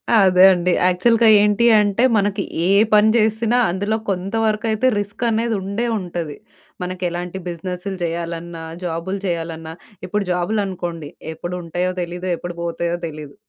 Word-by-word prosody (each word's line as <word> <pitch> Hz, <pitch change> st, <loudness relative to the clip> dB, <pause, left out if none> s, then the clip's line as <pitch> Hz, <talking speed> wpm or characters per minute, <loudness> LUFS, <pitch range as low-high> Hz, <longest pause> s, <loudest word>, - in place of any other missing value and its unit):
అదే 185 Hz, -3 st, +5 dB
అండి. 180 Hz, -1 st, +1 dB, 0.2 s
యాక్చువల్‌గా 225 Hz, +6 st, +3 dB
ఏంటి 210 Hz, +2 st, +3 dB
అంటే, 205 Hz, +3 st, +1 dB
మనకి 200 Hz, 0 st, 0 dB, 0.2 s
ఏ -, -, +2 dB, 0.3 s
పని 210 Hz, +1 st, +6 dB
జేసినా 220 Hz, +1 st, +2 dB
అందులో 205 Hz, +4 st, -1 dB
కొంత 190 Hz, +1 st, -2 dB
వరకయితే 220 Hz, +2 st, +1 dB
రిస్కనేది 225 Hz, +2 st, -1 dB
ఉండే 200 Hz, +5 st, -2 dB
ఉంటది. 170 Hz, -5 st, -5 dB, 0.5 s
మనకెలాంటి 180 Hz, 0 st, -3 dB
బిజినెస్లు 180 Hz, +3 st, -5 dB
జెయ్యాలన్నా, 170 Hz, 0 st, -4 dB, 0.2 s
జాబులు 175 Hz, +3 st, -3 dB
జెయ్యాలన్నా. 165 Hz, -2 st, -4 dB, 0.3 s
ఇప్పుడు 210 Hz, +2 st, -1 dB
జాబులనుకోండి, 180 Hz, -4 st, -2 dB, 0.2 s
ఎప్పుడుంటాయో 175 Hz, +2 st, -3 dB
తెలీదు, 175 Hz, +1 st, -4 dB
ఎప్పుడు 175 Hz, 0 st, -7 dB
బోతయో 170 Hz, 0 st, -2 dB
తెలీదు. 150 Hz, -2 st, -9 dB
185 Hz, 120 wpm, -20 LUFS, 170-210 Hz, 0.5 s, పని